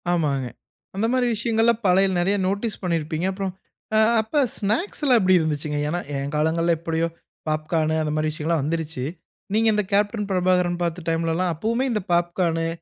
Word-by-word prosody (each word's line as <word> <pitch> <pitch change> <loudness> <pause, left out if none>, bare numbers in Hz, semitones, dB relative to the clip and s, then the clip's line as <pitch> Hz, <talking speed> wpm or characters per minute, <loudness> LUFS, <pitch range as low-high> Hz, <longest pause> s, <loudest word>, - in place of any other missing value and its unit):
ஆமாங்க. 145 -7 0 0.5
அந்த 205 +3 0
மாரி 255 -1 +2
விஷயங்கள்லாம் 225 +1 +1
பழைய 190 +2 +5
நெறைய 195 +4 +2
நோட்டீஸ் 205 +3 -2
பண்ணியிருப்பீங்க. 165 -1 -1
அப்புறம் 190 -1 -4 0.4
அ - - +6 0.2
அப்ப 220 +7 0 0.2
ஸ்நாக்ஸ்லாம் 250 - +1
எப்படி 185 0 +4
இருந்துச்சுங்க? 150 -2 -2
ஏன்னா 170 +4 -1 0.2
என் 140 +2 -4
காலங்கள்ல 165 +2 +2
எப்படியோ 165 0 -1 0.4
பாப்கார்னூ 155 +1 0
அந்த 150 -1 -2
மாரி 155 0 +1
விஷயங்கள்லாம் 155 0 -1
வந்துருச்சு. 160 -2 -3 0.5
நீங்க 225 +1 +3
இந்த 210 0 +1
கேப்டன் 205 +1 +1
பிரபாகரன் 180 -1 +1
பார்த்த 170 0 -3
டைம்லலாம் 165 +2 0
அப்பவுமே 230 - 0
இந்த 215 -2 0
பாப்கார்னு 170 -1 +1
175 Hz, 150 wpm, -23 LUFS, 160-205 Hz, 0.5 s, அ